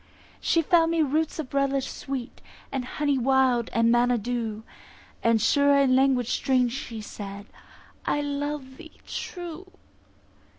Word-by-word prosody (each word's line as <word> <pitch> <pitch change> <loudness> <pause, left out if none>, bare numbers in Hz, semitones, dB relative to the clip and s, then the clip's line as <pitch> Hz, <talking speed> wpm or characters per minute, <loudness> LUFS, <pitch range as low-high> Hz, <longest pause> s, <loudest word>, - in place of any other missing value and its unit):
She 330 - +2
found 330 +1 +4
me 330 -1 +2
roots 310 +2 0
of 300 -5 -6
relish 275 -1 +1
sweet, 270 -3 -6 0.3
And 270 -2 -2
honey 285 +1 0
wild, 255 -2 +2
and 230 0 +3
manna 240 +1 +3
dew; 225 -1 -3 0.6
And 230 -1 +3
sure 280 +5 +4
in 270 -2 +4
language 260 -3 +2
strange 255 -2 +2
she 235 -5 -6
said, 200 -1 -8 0.6
"I - - 0
love 285 -2 -4
thee 320 - -14
true." 350 0 -6
265 Hz, 135 wpm, -26 LUFS, 240-290 Hz, 0.6 s, found